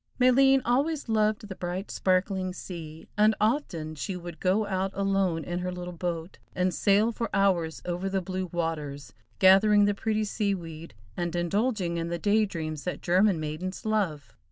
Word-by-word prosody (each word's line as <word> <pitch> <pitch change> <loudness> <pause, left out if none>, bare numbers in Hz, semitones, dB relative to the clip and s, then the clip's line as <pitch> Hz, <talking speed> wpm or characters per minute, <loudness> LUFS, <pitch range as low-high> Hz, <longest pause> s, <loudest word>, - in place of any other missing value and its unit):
Maleen 265 +1 +5
always 280 +5 +1
loved 215 -1 +1
the 195 - -6
bright, 180 +2 -4
sparkling 185 0 0
sea, 165 -4 -8
and 215 +1 +5
often 210 - 0
she 185 +5 -4
would 175 -2 -8
go 195 +4 +2
out 190 -1 -1
alone 195 -4 +1
in 175 0 -3
her 180 0 -3
little 180 0 -6
boat, 170 0 -4 0.2
and 185 0 +1
sail 205 +6 +3
for 230 0 -3
hours 180 -5 +1
over 180 +2 -2
the 195 0 0
blue 185 0 -4
waters, 155 -4 -3 0.2
gathering 205 +2 +6
the 205 - +2
pretty 215 +1 -1
sea 205 -1 0
weed, 165 - -9 0.2
and 175 -1 -2
indulging 185 0 0
in 165 0 -2
the 170 0 -2
day 210 +3 +2
dreams 155 -5 -5
that 180 - -4
German 185 0 +3
maidens 155 +7 -5
love. 190 -10 -1
185 Hz, 170 wpm, -27 LUFS, 170-210 Hz, 0.2 s, gathering